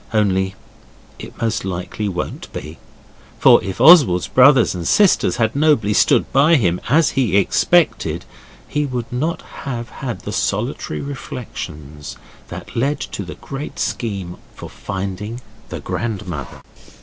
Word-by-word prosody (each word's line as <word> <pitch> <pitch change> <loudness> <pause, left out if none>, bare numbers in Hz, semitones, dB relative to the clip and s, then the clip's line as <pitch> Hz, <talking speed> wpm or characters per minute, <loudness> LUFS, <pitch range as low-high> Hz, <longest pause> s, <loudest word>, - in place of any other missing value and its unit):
Only 95 -2 +1 0.6
it - - -10
most 115 -1 -1
likely 95 +3 -4
won't 90 -1 -5
be. 75 +2 -8 0.6
For - - +6
if 95 - -5
Oswald's 140 - +7
brothers 130 -2 +5
and 85 -2 -4
sisters 200 - +3
had 115 0 0
nobly 140 -9 +3
stood - - +3
by 145 +5 +5
him 90 - +1
as 155 +4 +4
he 115 -8 +1
expected, 100 - +2 0.4
he 150 - -1
would 125 -4 -4
not 155 +7 -2 0.2
have 120 -3 -5
had 125 -4 -6
the - - -6
solitary 75 - -2
reflections 75 - -7 0.3
that - - -9
led 140 +5 0
to - - -5
the 90 - -8
great 140 +2 -7
scheme 100 -6 -3 0.2
for - - -10
finding 100 +4 -5 0.3
the - - -5
grandmother. 95 - -5
110 Hz, 135 wpm, -19 LUFS, 95-135 Hz, 0.6 s, Oswald's